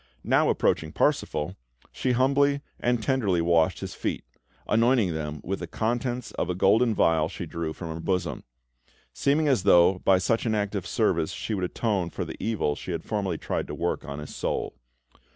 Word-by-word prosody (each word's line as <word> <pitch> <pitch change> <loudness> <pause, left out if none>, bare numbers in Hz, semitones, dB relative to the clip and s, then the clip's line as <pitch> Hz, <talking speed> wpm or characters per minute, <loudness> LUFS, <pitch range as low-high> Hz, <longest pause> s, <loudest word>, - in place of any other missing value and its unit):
Now - - +3
approaching 80 -1 +1
Parsifal, 75 +4 0 0.4
she 130 - -1
humbly 140 +3 +3 0.2
and 120 -2 0
tenderly 105 -9 +1
washed 85 -1 +2
his - - -5
feet, - - -3 0.4
anointing 115 -4 +3
them 75 -1 -4
with 95 +2 -3
the 85 - -5
contents 120 +4 -2
of - - -3
a 90 - -1
golden 110 +5 +3
vial 80 -3 +3
she 90 - -6
drew 85 0 -4
from 85 +1 -7
her 80 - -6
bosom; 90 0 -2 0.7
seeming 150 +2 +2
as 130 -8 +3
though, 90 -1 +5
by 95 0 +4
such 115 +6 0
an 110 - +1
act 105 -1 -1
of 100 -4 -3
service - - +1
she 110 - -4
would 95 -3 -1
atone 95 -2 -1
for - - -4
the - - -8
evil 105 -10 0
she 90 - -6
had 80 - -4
formerly 100 -6 -2
tried - - -3
to - - -5
work - - -1
to 70 0 -7
his 75 0 -8
soul. - - -2
95 Hz, 190 wpm, -26 LUFS, 85-115 Hz, 0.7 s, though